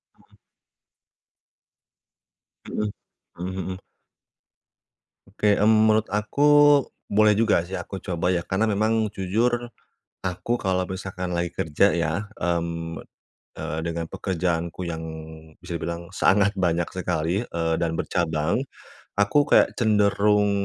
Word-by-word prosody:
Heeh. - - -27 2.3
Mhm, 105 -1 -2 0.5
mhm 95 +2 -4
mhm. - - -7 1.5
Oke, 105 +1 +1
mmm, 110 +1 +4
menurut 110 0 +3
aku, 105 +6 -2 0.7
boleh 105 +1 +5
juga 105 -5 +2
sih 95 - -10
aku 95 - -5
coba 90 -1 -2
ya, 90 -2 0
karena 105 +4 0
memang, 110 +1 +1
jujur, 120 +6 -1 0.5
aku 95 +7 -2
kalo 95 -3 0
misalkan 95 -1 -5
lagi 85 -1 -2
kerja 80 +6 +2
ya, 85 +5 -1 0.2
mmm, 85 -1 -2 0.6
eee, 80 - -4
dengan 85 0 -3
pekerjaanku 85 -1 -2
yang, 80 -1 -4 0.6
bisa 85 -1 -6
dibilang 85 +1 -4
sangat 100 +1 +3
banyak 85 -3 +1
sekali, 90 +2 -1
eee, 85 -6 -2
dan 80 -1 -1
bercabang. 80 - 0 0.5
Aku 105 +9 +3
kayak - - +5
cenderung, 105 -2 +3
95 Hz, 115 wpm, -24 LUFS, 85-105 Hz, 2.3 s, boleh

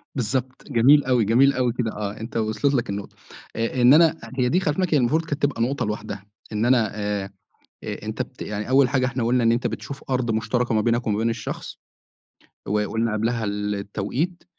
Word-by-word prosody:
بالضبط، 130 +1 -2
جميل 135 +5 +5
أوي، 125 -4 +2
جميل 130 +6 +4
أوي 125 -2 0
كده، 120 -3 -2
آه 105 -1 -5
أنت 115 +1 -5
وصَلِت 110 +6 0
لك 120 -6 0
النقطة 100 0 -5 0.4
آآ، 115 +3 -1
إن 125 +3 +7
أنا، 160 0 +5 0.2
هي 125 -1 +2
دي 180 - +3
خلّي 150 -6 0
في 190 - -5
بالك 180 -3 0
المفروض 150 +4 +2
كانت 145 -2 -4
تبقى 140 -5 +1
نقطة 130 +2 0
لوحدها، 105 -1 -5 0.3
إن 110 +2 0
أنا 120 -4 +3
آآ، 105 -1 -2 0.6
أ - - -5
أنت - - -2
بت - - -10
يعني 105 +2 -4
أول 135 -1 +5
حاجة 130 -1 +1
إحنا 125 -1 -2
قُلنا 120 0 +2
إن 115 - +4
أنت 120 +1 0
بتشوف 135 +4 -6
أرض 125 -2 0
مشترَكة 115 +2 0
ما 110 - +3
بينك 120 +2 0
ومابين 110 +2 +1
الشخص 115 -2 -6 0.9
وقُلنا 105 +2 0
قبْلها 115 +1 -1
التوقيت، 105 - -3
120 Hz, 195 wpm, -23 LUFS, 110-130 Hz, 0.9 s, إن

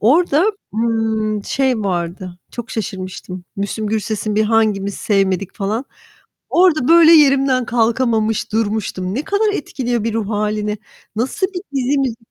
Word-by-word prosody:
orada, 300 - +3 0.3
ııı, 220 -2 0
şey 260 -4 0
vardı, 180 -1 -3
çok 240 -1 -7
şaşırmıştım. 185 -3 -6
Müslüm 200 +2 -3
Gürses'in 215 0 -2
bir 215 +1 +3
"Hangimiz 210 -3 +1
Sevmedik" 195 -2 0
falan. 215 +6 -2 0.6
Orada 340 -7 +3
böyle 335 0 +7
yerimden 275 -4 +4
kalkamamış, 225 -2 +1
durmuştum. 205 -4 -1
Ne 280 +6 -2
kadar 415 +1 +1
etkiliyor 245 - -2
bir 225 -1 -1
ruh 220 -3 -2
hâlini. 210 0 -1 0.4
Nasıl 270 - 0
bir 370 -2 -7
dizi. 270 -2 0
225 Hz, 125 wpm, -18 LUFS, 205-260 Hz, 0.6 s, böyle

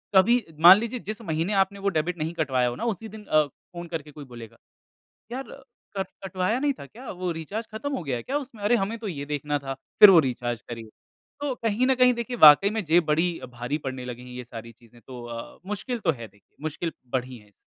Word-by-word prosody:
कभी 230 +5 +5 0.2
मान 175 +4 +10
लीजिए 235 +2 -3
जिस 220 +2 -8
महीने 165 0 -1
आपने 200 +1 -13
वो 200 0 +1
डेबिट 175 +3 -2
नहीं 160 +1 -3
कटवाया 135 -7 +1
हो 120 - -5
ना - - -4
उसी 220 +5 -10
दिन 215 0 -11
अ, 155 -4 +4
फ़ोन 170 +5 -11
करके 160 -3 -6
कोई 145 -1 -10
बोलेगा 120 -3 -11 0.8
यार 265 +2 -4 0.5
कर 195 - +1
कट - - -11 0.2
कटवाया 185 +6 0
नहीं 290 0 +2
था - - -8
क्या? 240 - -10
वो 180 -1 -3
रिचार्ज 195 +8 -5
खत्म 285 +6 -4
हो - - -4
गया 135 -5 -2
है 120 - -5
क्या 275 - -3
उसमें? 245 -7 -10
अरे, 235 +4 +4
हमें 220 +2 -2
तो 220 -2 -5
ये 145 -6 -4
देखना 145 0 -2
था, 135 -1 -5 0.3
फिर 210 - +12
वो 180 - +8
रिचार्ज 120 -4 -2
करिए। 115 -2 -7 0.5
तो 285 -2 -1
कहीं 230 +1 0
न 265 - +4
कहीं 250 -1 +5
देखिए 235 +1 -4
वाक़ई 155 +2 +8
में 220 -1 -2
जेब 170 +2 +4
बड़ी 165 +3 +1
अ, - - -8
भारी 125 +4 -4
पड़ने 130 -3 -5
लगी 125 -1 -7
है 125 - -11
ये 125 - -6
सारी 115 -1 -9
चीज़ें 120 +1 -21
तो 125 -2 -9
अ, 115 -1 -8
मुश्किल 210 +5 -3
तो 170 - +4
है 115 -7 -6
देखिए 105 +1 -30
मुश्किल 160 +2 -3 0.2
बढ़ी 130 0 -2
है 105 -1 -20
इससे। - - -29
165 Hz, 240 wpm, -26 LUFS, 130-215 Hz, 0.8 s, फिर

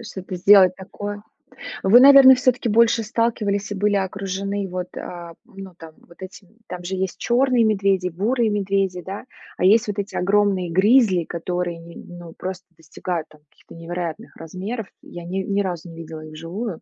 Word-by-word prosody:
Что-то 190 -5 -8
сделать 185 0 +6
такое. 205 +2 -7 0.6
Вы, 215 +6 +7
наверно, 275 -1 +9
все-таки 250 -1 0
больше 230 +1 +3
сталкивались 215 -3 -1
и - - -3
были 205 +1 +1
окружены 195 +1 -3
вот, 180 0 -5
а, 170 -1 -8
м, - - -23
ну, 190 -2 -13
там 160 -2 -12
вот 170 - -20
этими, 190 +2 -12
там 180 0 -8
же 190 +2 -4
есть 190 -1 -3
черные 250 0 +2
медведи, 195 -4 +1
бурые 220 +7 0
медведи, 195 -3 -1
да. 195 +7 -8 0.3
А - - -3
есть 220 +5 +4
вот 205 - -4
эти 200 - -5
огромные 195 -2 +1
гризли, 195 0 +3
которые, 175 +1 -4
не 165 0 -13
ну, 175 -2 -11
просто 185 +1 -7
достигают 165 +1 -6
там 155 -1 -21
каких-то - - -18
невероятных 165 0 -6
размеров. 190 +7 -6 0.2
Я 175 - -10
ни 180 +3 -5
ни 200 +1 -1
разу 180 -3 -4
не 165 - -11
видела 160 -1 -9
их 155 0 -11
вживую. 170 +5 -6
190 Hz, 175 wpm, -21 LUFS, 175-210 Hz, 0.6 s, наверно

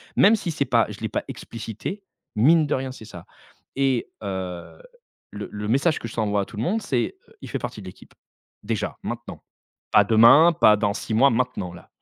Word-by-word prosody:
même 215 +4 +6
si 180 -5 -3
c'est 140 -2 -1
pas 120 -2 +3
je 105 - -9
l'ai 110 - -2
pas - - -2
explicité, 115 - -7 0.3
mine 155 +8 +4
de - - 0
rien, 130 0 -4
c'est 110 -4 -11
ça 90 -5 -11 0.5
et 135 -3 0
heu, 95 -3 -6 0.5
le - - -7
le 105 0 -5
message 140 +7 +2
que - - -6
je 110 - -10
ça 115 - -1
envoie 105 -1 0
à - - -3
tout 105 - -13
le 110 - -2
monde, 215 - 0
c'est: 120 - -1 0.3
«Il - - -9
fait - - -3
partie - - -6
de - - -10
l'équipe, - - -14 0.5
déjà, 105 -1 -3
maintenant. 120 0 -7 0.5
Pas 105 - +6
demain, 115 +10 +7
pas 110 -8 +5
dans 100 0 0
6 110 - -4
mois, 135 +5 +5
maintenant, 115 -7 -2
là». 90 - -14
115 Hz, 210 wpm, -23 LUFS, 105-135 Hz, 0.5 s, demain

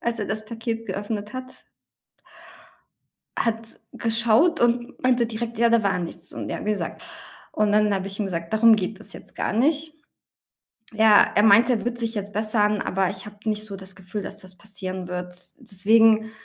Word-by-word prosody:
als 235 0 -2
er 210 - -2
das 215 +1 -2
Paket 225 0 -5
geöffnet 205 +1 -4
hat. 255 0 -8 1.8
Hat 225 -1 -2
geschaut 230 +8 +2
und 240 0 0
meinte 250 -2 +3
direkt: 230 0 -5
„Ja, 235 +1 +4
da 230 -1 +4
war 200 -2 +1
nichts.” 170 0 -7
Und - - -6
ja, - - -4
wie 210 - +1
gesagt, 210 - -4 0.5
und 210 -1 +1
dann 210 0 +3
habe 195 0 -2
ich 195 +1 -5
ihm 210 - 0
gesagt: 170 -1 -4
„Darum 225 +1 +6
geht 205 0 -4
es - - -8
jetzt - - -12
gar - - -2
nicht.” 300 +6 +1 1.0
Ja, 220 -1 +6
er 205 - +4
meinte, 225 +4 +6
er 220 - -3
wird 240 0 -2
sich 230 -1 -1
jetzt 205 -1 -5
bessern, 210 -1 +1
aber 190 0 0
ich 195 0 -6
habe 210 0 -11
nicht 215 -1 -1
so 200 -2 -7
das 190 0 -10
Gefühl, 190 +2 -6
dass - - -7
das 185 -1 -12
passieren 190 -3 -6
wird. 180 0 -5 0.2
Deswegen 220 +3 +3
215 Hz, 185 wpm, -24 LUFS, 200-230 Hz, 1.8 s, Darum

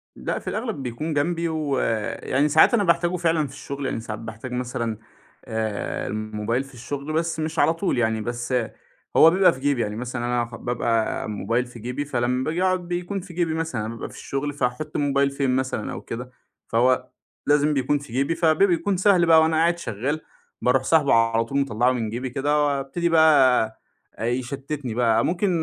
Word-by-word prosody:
لأ، - - -3
في - - -6
الأغلب 215 - -3
بيكون 130 +6 -3
جنبي 170 +3 0
ويعني 140 -2 0
ساعات 150 - +6
أنا 220 -4 +3
باحتاجه 170 0 +2
فعلًا 165 -3 +1
في 135 - -13
الشُغل، 140 -1 -6
يعني 120 - -2
ساعات 110 -1 -6
باحتاج 115 +2 -8
مثلًا 120 -3 -3 0.5
آآ، 110 -2 -3
الموبايل 110 +3 -2
في 135 0 -16
الشُغل، 140 +5 -5
بس 165 0 -1
مش 155 +1 -2
على 160 - +4
طول 165 -4 -1
يعني، 110 -2 +1
بس 120 +2 -4 0.6
هو 160 - +8
بيبقى 185 0 +4
في 130 - -10
جيبي، 140 -3 +1
يعني 105 -1 -2
مثلًا 120 +1 -4
أنا 120 -1 0
خ 115 -1 -10
بابقى 115 -2 -1
موبايل 115 +4 -1
في 120 -1 -12
جيبي، 125 +6 -4
فلمّا 125 -1 0
باجي 165 +5 -1
أقعُد 185 -2 +1
بيكون 175 +3 -3
في 180 -1 -11
جيبي 165 -2 0
مثلًا، 160 -10 -2
بابقى - - -6
في - - -14
الشُغل 145 +1 -3
فهاحُط 140 +3 -3
الموبايل 140 -1 +2
فين 135 -2 0
مثلًا 130 -5 -2
أو - - -6
كده؟ 125 +2 -7 0.4
فهو 130 +2 +2 0.4
لازم 145 +1 +3
بيكون 140 +1 +1
في 140 -5 -12
جيبي، 140 +6 +1
فبي 165 +3 +3
بيكون 180 +2 +1
سهل 185 -2 +4
بقى 160 -1 +7
وأنا 160 0 +2
قاعد 170 +2 +3
شغّال 145 +3 -3 0.4
باروح 125 +1 +2
ساحبه 150 0 +3
على 115 0 +3
طول 140 +4 -1
مطلَّعه 125 -1 +2
من 115 -4 -2
جيبي 125 +3 -4
كده 145 +3 +1
وأبتدي 140 +5 -1
بقى 150 -8 +5 0.5
آآ، 110 - -4
يشتِّتني 130 +1 -3
بقى. 115 -1 +2
ممكن 185 +3 0
135 Hz, 185 wpm, -24 LUFS, 120-160 Hz, 0.6 s, هو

